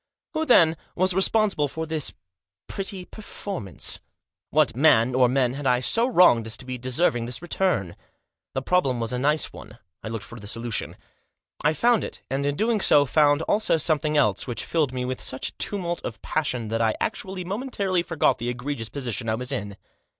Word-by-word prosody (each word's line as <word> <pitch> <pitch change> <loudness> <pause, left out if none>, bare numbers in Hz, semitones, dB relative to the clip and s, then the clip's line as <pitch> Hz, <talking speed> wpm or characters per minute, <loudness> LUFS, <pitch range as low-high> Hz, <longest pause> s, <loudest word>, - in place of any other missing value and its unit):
Who, 315 0 -1
then, 165 -10 +5 0.2
was 185 +1 +2
responsible 190 -4 +2
for 160 +3 -5
this 155 -2 -2 0.5
pretty 195 -2 -4
perform 200 - -7
since 90 - 0
t - - -29 0.5
What 145 -6 +2
man, 125 -3 +4
or 125 -1 +4
men, 125 -1 +1
had 140 0 -3
I 125 -1 +3
so 230 - +3
wronged 175 - +5
as 110 - -5
to 130 - -9
be 130 -1 -5
deserving 125 -1 +1
this 125 0 -3
return? 175 - 0 0.6
The 135 - -1
problem 135 -7 +1
was 115 +1 -2
a 125 - -1
nice 150 +4 +1
one. 105 +2 -12 0.2
I - - -7
looked 110 -1 -5
for 120 - -11
the 105 - -9
solution. 115 0 -3 0.7
I 150 +2 +3
found 235 +7 +3
it, - - -6
and, 140 +1 0
in 145 - 0
doing 220 +3 +1
so, 145 -5 +6
fotind 145 +2 +3
also 210 -5 +2
something 155 -1 +1
else, 105 -8 +2
which 120 - -4
filled 155 -5 0
me 125 -1 -3
with 130 0 -4
such 130 - -3
a - - -18
tumult 175 -4 -3
of 115 - -6
passion 125 -8 -2
that 115 +1 -1
I 110 -1 +2
actually 190 -4 -3
momentarily 200 -2 -1
forgot 165 -6 +1
the 120 +1 -2
egregious 125 -2 -4
position 120 -4 -3
I 110 - +1
was 125 +2 -4
in. 100 0 -4
145 Hz, 195 wpm, -24 LUFS, 120-180 Hz, 0.7 s, so